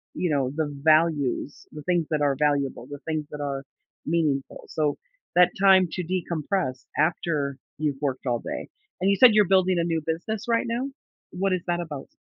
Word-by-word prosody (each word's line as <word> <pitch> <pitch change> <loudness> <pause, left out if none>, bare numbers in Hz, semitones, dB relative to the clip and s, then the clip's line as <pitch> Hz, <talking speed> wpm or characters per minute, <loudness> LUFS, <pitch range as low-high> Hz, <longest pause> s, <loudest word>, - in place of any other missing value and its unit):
you 180 - 0
know, 135 -3 +1
the 160 -2 0 0.2
values, 155 -4 +2
the 150 - -9
things 175 -2 +1
that 155 -2 0
are 140 -2 +2
valuable, 140 -3 0
the 145 +1 -7
things 155 -2 -2
that 150 - -6
are 140 -1 -3 0.4
meaningful, 150 -4 -1
so, 150 -2 0 0.4
that 180 0 +6
time 190 -2 +6
to 180 - -3
decompress 170 -5 -2
after 150 -3 0 0.2
you've 150 -2 -1
worked 135 -2 -2
all 120 -1 +1
day - - -6 0.3
and 190 - +3
you 200 - +4
said 245 -1 +8
you're 210 -1 +6
building 185 -1 +3
a 170 - +2
new 165 -2 0
business, 195 +8 -3
right 230 0 +2
now? 240 +4 -2 0.4
What 190 +1 0
is 185 - 0
that 175 0 0
about? 150 -5 -6
160 Hz, 185 wpm, -25 LUFS, 145-180 Hz, 0.4 s, said